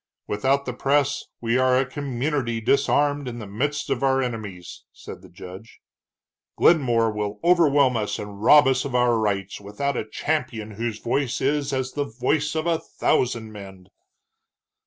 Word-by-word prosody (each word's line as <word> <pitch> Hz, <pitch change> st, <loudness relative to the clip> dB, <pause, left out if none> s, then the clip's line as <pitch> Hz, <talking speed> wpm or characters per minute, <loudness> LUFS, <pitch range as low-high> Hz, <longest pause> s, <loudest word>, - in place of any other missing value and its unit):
"Without 135 Hz, +7 st, 0 dB
the 125 Hz, -, -4 dB
press, 140 Hz, +2 st, 0 dB, 0.2 s
we 115 Hz, +2 st, +1 dB
are 130 Hz, 0 st, +3 dB
a 130 Hz, -, +2 dB
community 130 Hz, -2 st, -2 dB
disarmed 140 Hz, +3 st, +1 dB
in 120 Hz, -1 st, -5 dB
the 110 Hz, -, -7 dB
midst 145 Hz, +9 st, -2 dB
of 130 Hz, -, -1 dB
our 135 Hz, -1 st, +2 dB
enemies," 110 Hz, -8 st, -5 dB
said -, -, -11 dB
the -, -, -15 dB
judge. 95 Hz, +5 st, -12 dB, 0.8 s
"Glenmore 120 Hz, -8 st, +3 dB
will 105 Hz, -1 st, -4 dB
overwhelm 145 Hz, -7 st, +4 dB
us 105 Hz, -2 st, -2 dB
and 105 Hz, -1 st, -8 dB
rob 150 Hz, +6 st, +7 dB
us 130 Hz, 0 st, +2 dB
of 135 Hz, -3 st, -4 dB
our 120 Hz, -2 st, +3 dB
rights, 100 Hz, -2 st, -2 dB
without 125 Hz, +8 st, -3 dB
a 110 Hz, -, -4 dB
champion 115 Hz, -7 st, -3 dB
whose 110 Hz, +1 st, -4 dB
voice 125 Hz, +3 st, -1 dB
is 140 Hz, +1 st, 0 dB
as 130 Hz, -1 st, -2 dB
the 145 Hz, +1 st, -2 dB
voice 150 Hz, +4 st, 0 dB
of 160 Hz, 0 st, -1 dB
a 165 Hz, -2 st, +1 dB
thousand 115 Hz, -3 st, -1 dB
men." 95 Hz, -3 st, -11 dB
125 Hz, 160 wpm, -23 LUFS, 110-140 Hz, 0.8 s, rob